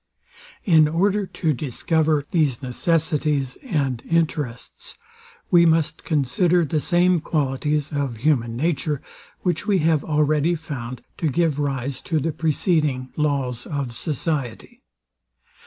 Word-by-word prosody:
In 160 Hz, -5 st, +6 dB
order 195 Hz, +5 st, +1 dB
to 160 Hz, -4 st, -1 dB
discover 150 Hz, +3 st, 0 dB
these 145 Hz, -8 st, +1 dB
necessities 150 Hz, -1 st, 0 dB
and 140 Hz, -, -1 dB
interests, 150 Hz, -7 st, -2 dB, 0.5 s
we 175 Hz, -2 st, +7 dB
must 160 Hz, -2 st, +2 dB
consider 165 Hz, +4 st, +2 dB
the 155 Hz, +1 st, 0 dB
same 175 Hz, +2 st, +3 dB
qualities 150 Hz, -1 st, -1 dB
of 140 Hz, -5 st, -2 dB
human 120 Hz, -3 st, +1 dB
nature, 150 Hz, -1 st, -1 dB, 0.4 s
which 180 Hz, +2 st, -1 dB
we 200 Hz, -2 st, +3 dB
have 160 Hz, -3 st, +2 dB
already 150 Hz, +2 st, +2 dB
found 130 Hz, -6 st, -7 dB, 0.2 s
to 160 Hz, -, +1 dB
give 155 Hz, 0 st, +1 dB
rise 135 Hz, -2 st, -2 dB
to 160 Hz, -2 st, -1 dB
the 165 Hz, +3 st, -1 dB
preceding 150 Hz, -4 st, 0 dB
laws 140 Hz, -5 st, -1 dB
of 140 Hz, -5 st, -4 dB
society. 140 Hz, -1 st, -3 dB
150 Hz, 120 wpm, -22 LUFS, 135-165 Hz, 0.5 s, we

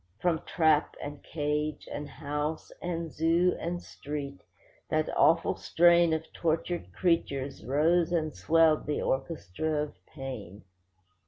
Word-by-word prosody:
From 170 Hz, -3 st, +1 dB
trap, 160 Hz, -3 st, +3 dB
and 145 Hz, 0 st, -7 dB
cage, 150 Hz, -1 st, -2 dB
and 145 Hz, 0 st, -5 dB
house, 150 Hz, +1 st, -4 dB
and 170 Hz, -2 st, -3 dB
zoo, 165 Hz, +3 st, +3 dB
and 175 Hz, +1 st, -3 dB
street, 140 Hz, -1 st, -6 dB, 0.5 s
that 155 Hz, -1 st, 0 dB
awful 165 Hz, 0 st, +4 dB
strain 170 Hz, 0 st, +4 dB
Of 160 Hz, 0 st, -1 dB
tortured 170 Hz, +1 st, -1 dB
creatures 140 Hz, -, 0 dB
rose 160 Hz, +8 st, +2 dB
and 155 Hz, -3 st, 0 dB
swelled 160 Hz, -1 st, +3 dB
the 150 Hz, -, -1 dB
orchestra 150 Hz, -, -1 dB
of 150 Hz, -, -7 dB
pain. 110 Hz, -7 st, -8 dB
155 Hz, 120 wpm, -29 LUFS, 145-165 Hz, 0.5 s, awful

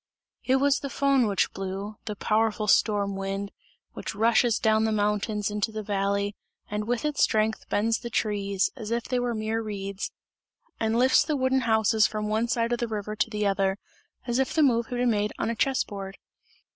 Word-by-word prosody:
It 260 Hz, -, +2 dB
was 275 Hz, +1 st, +3 dB
the 280 Hz, -, -4 dB
Föhn 275 Hz, -4 st, +2 dB
which 200 Hz, -, 0 dB
blew, 195 Hz, +2 st, -5 dB
the 210 Hz, -, -4 dB
powerful 215 Hz, +1 st, +1 dB
storm 200 Hz, -3 st, +2 dB
wind, 195 Hz, +1 st, -3 dB, 0.4 s
which -, -, -6 dB
rushes 225 Hz, +1 st, +3 dB
down 220 Hz, 0 st, +2 dB
the 220 Hz, -, +1 dB
mountains 210 Hz, 0 st, 0 dB
into 210 Hz, +1 st, -1 dB
the 215 Hz, 0 st, -5 dB
valley 200 Hz, 0 st, -1 dB, 0.4 s
and 210 Hz, +1 st, -2 dB
with 245 Hz, +4 st, -1 dB
its 300 Hz, -1 st, 0 dB
strength 220 Hz, 0 st, +1 dB
bends 225 Hz, +2 st, +1 dB
the 235 Hz, -, -6 dB
trees, 200 Hz, -4 st, 0 dB
as 220 Hz, -5 st, -7 dB
if 235 Hz, 0 st, -1 dB
they 250 Hz, +1 st, -1 dB
were 245 Hz, -1 st, -1 dB
mere 220 Hz, +1 st, -1 dB
reeds, 200 Hz, -2 st, -5 dB, 0.7 s
and 225 Hz, +1 st, +1 dB
lifts 255 Hz, +3 st, +5 dB
the 295 Hz, -1 st, -1 dB
wooden 260 Hz, 0 st, +2 dB
houses 220 Hz, 0 st, +4 dB
from 210 Hz, 0 st, -3 dB
one 220 Hz, +2 st, +1 dB
side 235 Hz, -1 st, 0 dB
of 240 Hz, -, -1 dB
the 240 Hz, -, -1 dB
river 215 Hz, -1 st, -4 dB
to 225 Hz, -, +1 dB
the 210 Hz, -1 st, -2 dB
other, 195 Hz, -1 st, +1 dB, 0.5 s
as 240 Hz, 0 st, 0 dB
if 265 Hz, -, 0 dB
the 315 Hz, -, +4 dB
move 235 Hz, -4 st, +3 dB
had 245 Hz, -, -4 dB
been 245 Hz, -1 st, +2 dB
made 210 Hz, -1 st, 0 dB
on 230 Hz, -, -1 dB
a -, -, -3 dB
chess 265 Hz, +4 st, +1 dB
board. 195 Hz, -1 st, -8 dB
215 Hz, 200 wpm, -26 LUFS, 205-235 Hz, 0.7 s, lifts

